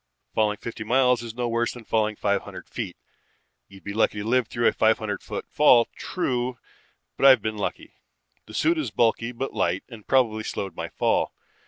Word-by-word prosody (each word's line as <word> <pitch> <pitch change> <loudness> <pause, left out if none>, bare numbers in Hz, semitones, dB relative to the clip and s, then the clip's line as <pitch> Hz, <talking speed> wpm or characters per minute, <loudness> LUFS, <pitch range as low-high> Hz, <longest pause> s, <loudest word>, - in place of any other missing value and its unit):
Falling 105 -1 +1
fifty 115 0 -6
miles 125 +1 +3
is 115 -1 -7
no 120 0 -1
worse 115 0 0
than 120 -2 -11
falling 110 -1 +1
five 100 -1 0
hundred - - -10
feet. - - -5 0.7
You'd 95 0 -15
be 100 - -5
lucky 110 -1 +1
to - - -6
live 125 -1 +2
through 120 +1 -2
a - - +3
five 110 0 +3
hundred 105 -2 -4
foot - - -6
fall, 125 -6 +5
true, 125 -7 -2 0.6
but - - +5
I've 130 -6 +7
been 110 -1 -2
lucky. 100 - -4 0.5
The - - -10
suit 330 +1 +2
is 310 - -2
bulky 115 +1 +1
but 130 +3 -4
light 90 +2 0
and 115 -4 -12
probably 115 -5 +2
slowed 95 -4 -4
my - - -5
fall. - - 0
115 Hz, 195 wpm, -25 LUFS, 110-125 Hz, 0.7 s, I've